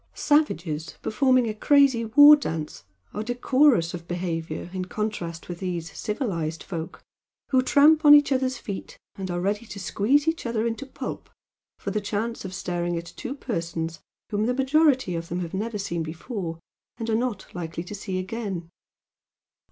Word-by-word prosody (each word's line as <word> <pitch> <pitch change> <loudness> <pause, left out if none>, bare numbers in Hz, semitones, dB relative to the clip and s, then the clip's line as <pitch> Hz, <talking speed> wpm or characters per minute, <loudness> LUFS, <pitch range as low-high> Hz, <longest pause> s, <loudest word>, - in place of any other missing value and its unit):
Savages 170 - 0
performing 255 +2 +3
a 215 - -2
crazy 265 0 +4
war 290 +7 +9
dance 160 - -5 0.3
are 210 - -3
decorous 245 - +3
of 170 -1 -7
behaviour 175 -2 -3
in 185 -1 -3
contrast 185 -6 -4
with 175 -1 -6
these 175 -3 -4
"civilised" 180 - -3
folk 165 -3 -6 0.5
who 260 -2 +4
tramp 300 +4 +5
on 295 -1 +10
each 290 -1 +4
other's 260 -1 +1
feet 200 -5 -7 0.2
and 190 -1 -5
are 175 0 -2
ready 205 +5 -1
to 200 - -8
squeeze 255 - +1
each 320 -6 0
other 230 -1 -1
into 235 +4 -3
pulp - - -6 0.5
for 200 - -4
the 210 +1 -1
chance 215 +3 -3
of 190 - -6
staring 175 -1 -2
at 170 0 -7
two 265 - -5
persons 165 - -4 0.3
whom 210 +1 0
the 250 - +1
majority 270 - +3
of 165 0 -4
them 175 +1 -2
have 170 0 -5
never 215 +3 -2
seen 170 -4 -3
before 165 +2 -5 0.4
and 230 -1 -4
are 225 - 0
not 230 -3 -1
likely 170 -1 -5
to 180 - -9
see 195 -2 -4
again. 185 -4 -4
205 Hz, 165 wpm, -25 LUFS, 170-255 Hz, 0.5 s, on